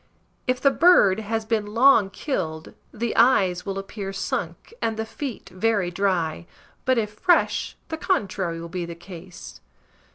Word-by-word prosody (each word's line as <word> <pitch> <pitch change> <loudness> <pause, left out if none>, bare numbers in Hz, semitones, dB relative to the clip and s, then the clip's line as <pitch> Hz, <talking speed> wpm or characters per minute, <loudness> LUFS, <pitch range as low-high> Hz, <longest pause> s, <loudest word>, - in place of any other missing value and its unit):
If 255 0 +1
the 275 - +4
bird 270 - +5
has 220 +1 -3
been 215 -1 -2
long 245 -5 +6
killed, 165 - -4 0.2
the 235 0 -3
eyes 195 -8 +3
will 195 0 -3
appear 195 0 -5
sunk 195 - -4
and 225 -1 -1
the 220 - -2
feet 240 -3 -6
very 190 -1 0
dry; 175 -3 -1 0.4
but, 260 -1 +3
if 210 -2 -1
fresh, 350 - +1
the 320 - -3
contrary 190 - -1
will 170 - -7
be 175 +1 -4
the 170 - -7
case. 175 - -11
205 Hz, 155 wpm, -24 LUFS, 185-230 Hz, 0.4 s, long